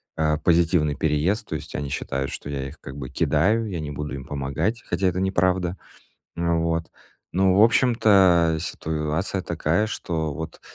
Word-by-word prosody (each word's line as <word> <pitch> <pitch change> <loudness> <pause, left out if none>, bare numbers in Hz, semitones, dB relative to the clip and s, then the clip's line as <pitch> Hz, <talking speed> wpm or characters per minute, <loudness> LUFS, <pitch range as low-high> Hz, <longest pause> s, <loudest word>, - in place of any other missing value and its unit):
а, 75 -1 +1
позитивный 85 -3 +2
переезд. 80 +8 0
То - - -6
есть 80 0 -7
они 70 -1 -3
считают, 70 0 -3
что 70 - -6
я 70 -1 -3
их - - -14
как 65 +2 -9
бы 65 -2 -6
кидаю, 105 +12 +2
я 85 -4 -4
не 75 -1 -5
буду 75 -1 -5
им 65 -2 -8
помогать, 75 - -2
хотя 90 +2 -1
это 90 +1 0
неправда. 95 -1 +1 0.6
А, 85 0 +1
вот. 80 0 -1 0.4
Ну, 95 +1 +3
в 105 - +7
общем-то, 100 -9 +4
ситуация 80 +4 -2
такая, 85 +5 0
что 80 -7 -3
вот 80 0 -7
80 Hz, 170 wpm, -24 LUFS, 75-95 Hz, 0.6 s, в